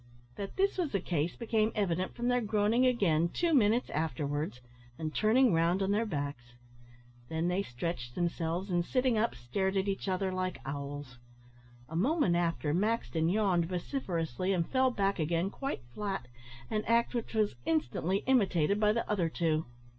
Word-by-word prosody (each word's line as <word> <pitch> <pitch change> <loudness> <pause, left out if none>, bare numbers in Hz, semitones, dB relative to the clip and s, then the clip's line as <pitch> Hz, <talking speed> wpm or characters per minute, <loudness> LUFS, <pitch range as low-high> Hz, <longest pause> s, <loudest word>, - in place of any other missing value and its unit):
That 200 -1 -6
this 390 0 +1
was 330 -9 -1
the 200 - +2
case 170 -2 -1
became 225 -2 +1
evident 185 -3 -1
from 240 0 -2
their 245 0 +2
groaning 215 +3 +2
again, 170 -9 +2
two 340 - 0
minutes 235 -2 +3
afterwards, 145 -3 -2 0.4
and 155 -1 -4
turning 225 +1 +4
round 170 +4 +2
on 195 - +1
their 220 +3 +1
backs. 140 - -4 0.7
Then 160 +2 0
they 180 +2 +1
stretched 120 -4 -4
themselves, 175 +2 -1
and, 175 -1 +2
sitting 255 +4 +1
up, 225 +2 +1
stared 190 +12 -1
at 190 +1 +1
each 195 0 -2
other 190 0 0
like 185 -1 -2
owls. 140 -2 -6 0.7
A 160 - -8
moment 235 - +2
after, 165 -3 0
Maxton 170 - +1
yawned 185 -4 +2
vociferously, 180 - -2
and 170 -3 0
fell 260 -1 +3
back 200 -5 0
again 170 +4 0
quite 270 - -4
flat, 195 -8 -3 0.4
an 215 0 0
act 235 +2 +2
which 235 -1 -3
was 215 -5 +2
instantly 165 +5 0
imitated 200 -7 +3
by 210 0 +4
the 230 - -1
other 185 -6 +1
two. 160 -2 0
185 Hz, 165 wpm, -31 LUFS, 160-215 Hz, 0.7 s, turning